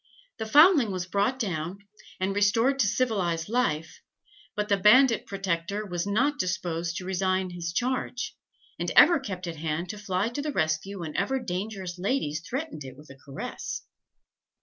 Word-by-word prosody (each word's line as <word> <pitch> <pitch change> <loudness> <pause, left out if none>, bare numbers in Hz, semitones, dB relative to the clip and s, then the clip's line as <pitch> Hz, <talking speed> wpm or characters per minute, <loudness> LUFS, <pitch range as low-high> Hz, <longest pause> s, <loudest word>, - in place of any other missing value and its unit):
The 220 - -3
foundling 295 - +6
was 185 -1 -3
brought 200 +7 0
down, 180 -6 -3 0.4
and 190 +1 0
restored 225 +7 +3
to 220 - +4
civilized 190 -8 0
life, 165 -10 -1 0.5
but 210 0 -1
the 205 - +3
bandit 230 +5 +5
protector 195 +1 -2
was 175 -1 -3
not 270 +8 +1
disposed 175 -2 -2
to 180 - -5
resign 185 0 0
his 170 -1 -4
charge, 250 +4 -2 0.4
and - - -1
ever 345 -3 +8
kept 190 -8 -6
at 170 -2 -5
hand 160 +3 -3
to 210 - -6
fly 200 0 -1
to 245 +5 -4
the 300 +1 -2
rescue 165 - -1
whenever 170 - -1
dangerous 185 -3 -4
ladies 180 - -1
threatened 265 - -5
it 130 -1 -10
with 150 0 -14
a - - -11
caress." 135 0 -6
195 Hz, 160 wpm, -27 LUFS, 170-235 Hz, 0.5 s, ever